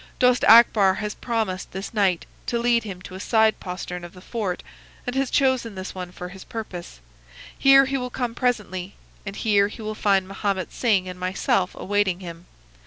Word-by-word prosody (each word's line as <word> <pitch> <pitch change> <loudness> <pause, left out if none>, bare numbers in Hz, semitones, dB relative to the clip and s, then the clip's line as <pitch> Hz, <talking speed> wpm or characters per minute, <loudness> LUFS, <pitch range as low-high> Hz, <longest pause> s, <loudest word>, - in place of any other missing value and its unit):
Dost 250 -1 +3
Akbar 220 -4 +7
has 210 +1 -3
promised 220 -6 -3
this 190 +5 -6
night 195 -5 +1 0.2
to 240 - 0
lead 235 -1 +2
him 185 -3 -7
to 185 - -10
a 185 - -7
side 220 +1 +3
postern 180 -1 -6
of 175 - -9
the 185 - -13
fort, 200 -4 -3 0.4
and 245 0 -3
has 270 -1 +1
chosen 260 -6 +1
this 185 0 -6
one 180 -1 -6
for 180 0 -8
his 190 +1 -11
purpose. 180 - -7 0.6
Here 275 0 +6
he 270 0 -1
will 250 0 -4
come 245 -2 -3
presently, 205 -7 -2 0.3
and 195 - -5
here 205 -2 +3
he 220 +2 -9
will 215 0 -3
find 195 -3 +2
Mahomet 195 -2 -2
Singh 205 -6 +1
and 180 0 -7
myself 185 0 0
awaiting 205 -2 0
him. 170 -1 -9
200 Hz, 185 wpm, -24 LUFS, 185-235 Hz, 0.6 s, Akbar